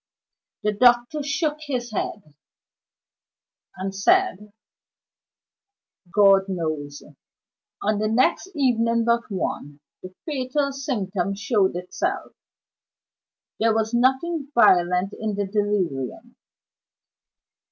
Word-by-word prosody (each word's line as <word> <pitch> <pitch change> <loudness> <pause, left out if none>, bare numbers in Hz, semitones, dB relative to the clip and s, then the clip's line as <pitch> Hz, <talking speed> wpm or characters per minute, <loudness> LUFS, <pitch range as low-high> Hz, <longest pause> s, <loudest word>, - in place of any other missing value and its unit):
The 210 - +2
doctor 240 +6 +3
shook 295 +2 -1
his 245 -4 -3
head, 195 -6 -5 1.4
and 190 +1 -4
said 210 - +1 1.6
"God 195 -1 +5
knows." 155 -5 -4 0.8
On 210 0 +1
the 215 - 0
next 250 - +1
evening 230 -4 +2
but 235 0 +1
one, 145 -7 -4 0.2
the 185 0 -11
fatal 280 -1 -1
symptom 200 -9 -2
showed 205 -3 +1
itself. 180 +1 -3 1.3
There 225 0 +2
was 220 +1 0
nothing 265 +5 +1
violent 180 -3 +4
in 215 -2 -3
the 205 0 -1
delirium. 205 - -2
215 Hz, 90 wpm, -23 LUFS, 195-250 Hz, 1.6 s, God